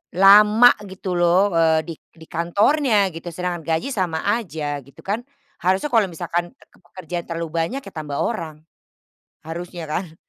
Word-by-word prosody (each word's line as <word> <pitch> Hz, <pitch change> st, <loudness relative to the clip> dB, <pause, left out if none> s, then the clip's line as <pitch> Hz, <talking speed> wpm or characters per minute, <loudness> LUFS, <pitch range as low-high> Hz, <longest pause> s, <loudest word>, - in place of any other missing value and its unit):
lama 210 Hz, +5 st, +7 dB, 0.2 s
gitu 185 Hz, -1 st, -4 dB
loh, 180 Hz, +4 st, +4 dB
eee, 160 Hz, -1 st, +4 dB
di -, -, -3 dB, 0.3 s
di 160 Hz, -, -13 dB
kantornya 205 Hz, -, +2 dB
gitu. 165 Hz, +1 st, -9 dB
Sedangkan 175 Hz, -1 st, -4 dB
gaji 165 Hz, +11 st, -1 dB
sama 175 Hz, -5 st, -1 dB, 0.2 s
aja, 150 Hz, -8 st, -4 dB
gitu 140 Hz, -, -17 dB
kan? 205 Hz, +4 st, -1 dB, 0.4 s
Harusnya 190 Hz, +10 st, +1 dB
kalau 225 Hz, -3 st, +5 dB
misalkan 170 Hz, +1 st, -2 dB
tekepe -, -, -24 dB
pekerjaan 175 Hz, -1 st, -6 dB
terlalu 165 Hz, -1 st, -4 dB
banyak 250 Hz, +12 st, -2 dB
ya -, -, -9 dB
tambah 145 Hz, -2 st, -4 dB
orang. 165 Hz, -9 st, -3 dB, 0.9 s
Harusnya 170 Hz, +1 st, -6 dB
kan? 175 Hz, -2 st, -4 dB
175 Hz, 150 wpm, -21 LUFS, 165-200 Hz, 0.9 s, lama